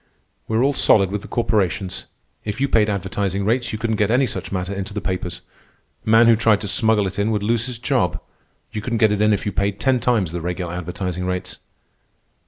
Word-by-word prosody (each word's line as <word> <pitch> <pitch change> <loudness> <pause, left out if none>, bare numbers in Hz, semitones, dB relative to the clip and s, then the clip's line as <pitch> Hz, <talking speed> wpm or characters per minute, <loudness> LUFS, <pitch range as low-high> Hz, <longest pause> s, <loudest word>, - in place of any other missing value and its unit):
"We're 110 +2 +1
all 140 +1 +3
solid 100 -7 +4
with 105 0 -2
the - - -10
corporations," 100 -6 0
he - - -5
answered. - - -14
"If - - -9
you 140 - +2
paid 110 -3 +3
advertising 100 0 -2
rates, 120 +3 +1
you 110 - -3
couldn't 110 0 -1
get 105 0 +2
any 125 +4 +3
such - - -5
matter 95 0 -2
into 100 +1 -5
the - - 0
papers. 90 -3 -4 0.7
A - - 0
man 115 +1 +7
who 115 0 +6
tried 110 -2 +3
to 105 - -4
smuggle 105 +1 +2
it 95 +1 -4
in 100 +2 +1
would 105 -2 0
lose 115 +2 +1
his 125 -2 -4
job. 120 - 0 0.5
You 105 - -4
couldn't 115 +2 -2
get 110 -2 +4
it 105 0 0
in 105 0 +4
if 105 - 0
you 105 - -1
paid 100 +1 -1
ten 130 -2 +2
times 110 -9 +1
the 85 0 -4
regular 90 0 -3
advertising 90 +1 -4
rates." 90 0 -4
105 Hz, 230 wpm, -21 LUFS, 95-115 Hz, 0.7 s, man